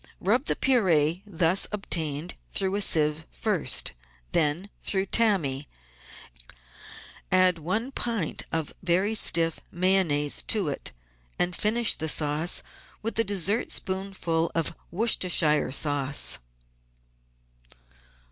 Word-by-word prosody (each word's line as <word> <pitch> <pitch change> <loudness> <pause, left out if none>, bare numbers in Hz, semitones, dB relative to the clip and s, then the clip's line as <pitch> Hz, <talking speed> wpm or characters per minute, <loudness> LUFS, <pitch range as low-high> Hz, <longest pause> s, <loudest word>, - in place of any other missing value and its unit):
Rub 240 +8 0
the - - +2
pur^e 180 - +2
thus 180 -1 +2
obtained 165 -5 -3 0.2
through 190 -1 0
a 205 - 0
sieve 155 -3 +2
first, 185 - 0 0.4
then 170 +5 0
through 190 -1 0
tammy, 165 -13 0 1.6
add 185 -2 +3
one 215 - -3
pint 230 - -3
of 160 -2 -2
very 185 +4 +1
stiff 165 -6 +2
Mayonnaise 175 -6 +2
to 200 -8 +1
it, 140 - -5 0.5
and 175 0 0
finish 225 +4 +2
the 160 +1 -3
sauce 150 +3 +1 0.4
with 225 +1 -2
a - - +5
dessertspoonful 190 -3 -1
of 165 0 0
Worcestershire 175 - +2
sauce. 140 0 +1
175 Hz, 100 wpm, -26 LUFS, 155-200 Hz, 1.6 s, a